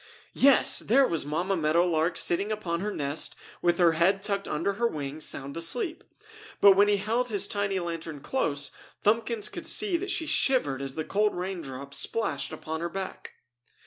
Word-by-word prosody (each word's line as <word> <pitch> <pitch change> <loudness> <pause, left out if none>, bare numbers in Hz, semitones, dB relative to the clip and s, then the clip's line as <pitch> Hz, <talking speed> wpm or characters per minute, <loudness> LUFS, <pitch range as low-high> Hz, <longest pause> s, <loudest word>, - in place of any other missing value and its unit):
Yes! 275 -1 +5
There 270 +5 +4
was 160 -4 -2
Mamma 175 +6 -1
Meadow 165 +1 +2
Lark 165 0 0
sitting 200 +5 +1
upon 180 -6 -2
her 210 +3 -3
nest 145 -3 -1 0.3
with 175 -1 +2
her 175 -2 +5
head 185 +5 +2
tucked 200 -1 -2
under 165 +6 -1
her 235 - +4
wing, 145 -5 -5
sound 140 -2 -3
asleep. 240 - 0 0.6
But 200 - +8
when 200 +2 +5
he 205 0 +3
held 230 +5 -1
his 205 -2 +1
tiny 200 -2 -1
lantern 165 -3 -5
close, 145 - -1 0.3
Thumbkins 225 +1 +1
could - - -6
see 395 -5 +2
that 385 +3 -5
she 325 - -1
shivered 155 - +1
as 135 -1 -5
the 155 - -3
cold 210 +1 +1
raindrops 140 -7 -5
splashed 230 - -2
upon 160 +1 -5
her 170 - -2
back. 190 +1 -7
180 Hz, 175 wpm, -27 LUFS, 155-210 Hz, 0.6 s, But